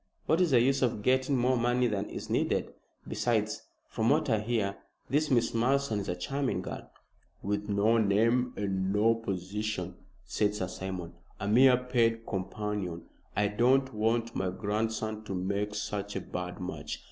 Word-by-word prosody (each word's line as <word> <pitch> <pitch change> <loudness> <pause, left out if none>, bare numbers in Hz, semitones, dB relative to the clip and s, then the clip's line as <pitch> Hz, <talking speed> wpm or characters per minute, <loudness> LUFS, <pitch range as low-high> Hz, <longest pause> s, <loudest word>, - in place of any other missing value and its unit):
What 165 - +3
is 180 - +4
the 130 -4 +5
use 135 +3 +2
of 115 -5 0
getting 130 +2 +2
more 125 +1 +3
money 120 +1 +2
than 105 -3 -1
is - - -6
needed? - - 0 0.3
Besides, - - 0 0.3
from 110 0 0
what 150 -1 +2
I 110 - +3
hear, 105 -3 -1 0.3
this 150 +2 +2
Miss 120 -4 +3
Malleson 125 -1 +1
is 100 - -4
a 90 - 0
charming 135 +9 -2
girl." - - -7 0.5
"With 105 +1 -2
no 105 +3 +3
name 115 +4 +3
and 95 -2 -1
no 105 +3 +4
position," 105 0 -3 0.3
said 105 0 0
Sir 95 -3 -3
Simon, 90 -2 -5 0.3
"a 105 - -3
mere 125 +4 +6
paid 115 -3 +1
companion. 95 -3 -3 0.3
I 105 0 +2
don't 130 +5 +3
want 115 +2 0
my 95 -1 0
grandson 110 +2 -2
to 100 - -4
make 100 +3 -2
such 100 0 -3
a 95 - -2
bad 90 0 -5
match. 90 - -5
110 Hz, 165 wpm, -30 LUFS, 100-125 Hz, 0.5 s, mere